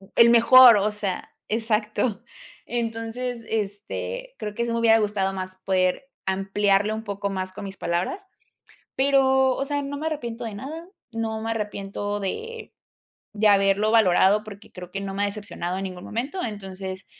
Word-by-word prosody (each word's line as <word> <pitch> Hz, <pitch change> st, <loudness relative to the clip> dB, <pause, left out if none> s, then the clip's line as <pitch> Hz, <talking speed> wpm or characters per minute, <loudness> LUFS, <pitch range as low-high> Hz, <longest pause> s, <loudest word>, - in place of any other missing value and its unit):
el 235 Hz, 0 st, +7 dB
mejor. 240 Hz, +1 st, +9 dB
O 205 Hz, +1 st, +1 dB
sea 200 Hz, -3 st, -4 dB, 0.2 s
exacto. 215 Hz, 0 st, 0 dB, 0.4 s
Entonces, 230 Hz, +1 st, -3 dB
este, 220 Hz, -, -4 dB
creo 210 Hz, -, -4 dB
que, 235 Hz, -, -1 dB
sí 235 Hz, -, -2 dB
me 230 Hz, -, 0 dB
hubiera 225 Hz, -1 st, +5 dB
gustado 205 Hz, -2 st, 0 dB
más, 185 Hz, 0 st, -5 dB
poder 190 Hz, +7 st, +1 dB, 0.2 s
ampliarlo 195 Hz, +2 st, +1 dB
un 220 Hz, -, -6 dB
poco 200 Hz, -1 st, -3 dB
más, 185 Hz, -1 st, -4 dB
con 200 Hz, -, -8 dB
mis 195 Hz, 0 st, -8 dB
palabras. 180 Hz, -, -2 dB, 0.7 s
Pero, 265 Hz, -1 st, +4 dB
o 275 Hz, -, -2 dB
sea, 285 Hz, 0 st, -1 dB
no 285 Hz, +1 st, -5 dB
me 315 Hz, +2 st, -3 dB
arrepiento 240 Hz, -6 st, -4 dB
de 215 Hz, -, -5 dB
nada. 315 Hz, -, -7 dB, 0.2 s
No 225 Hz, -1 st, -3 dB
me 225 Hz, +1 st, -2 dB
arrepiento 205 Hz, -1 st, -3 dB
de 455 Hz, -, -5 dB, 0.6 s
de 215 Hz, +1 st, +1 dB
haberlo 195 Hz, +1 st, +4 dB
valorado, 205 Hz, -1 st, +5 dB
porque 205 Hz, -1 st, -12 dB
creo, 180 Hz, -1 st, -9 dB
que 195 Hz, +2 st, -4 dB
no 195 Hz, -1 st, -4 dB
me 200 Hz, -, -1 dB
ha -, -, +2 dB
decepcionado, 200 Hz, -3 st, -5 dB
en 195 Hz, -, -3 dB
ningún 185 Hz, -1 st, -7 dB
momento. 270 Hz, -, -4 dB
Entonces, 190 Hz, -3 st, -6 dB
215 Hz, 165 wpm, -24 LUFS, 195-235 Hz, 0.7 s, mejor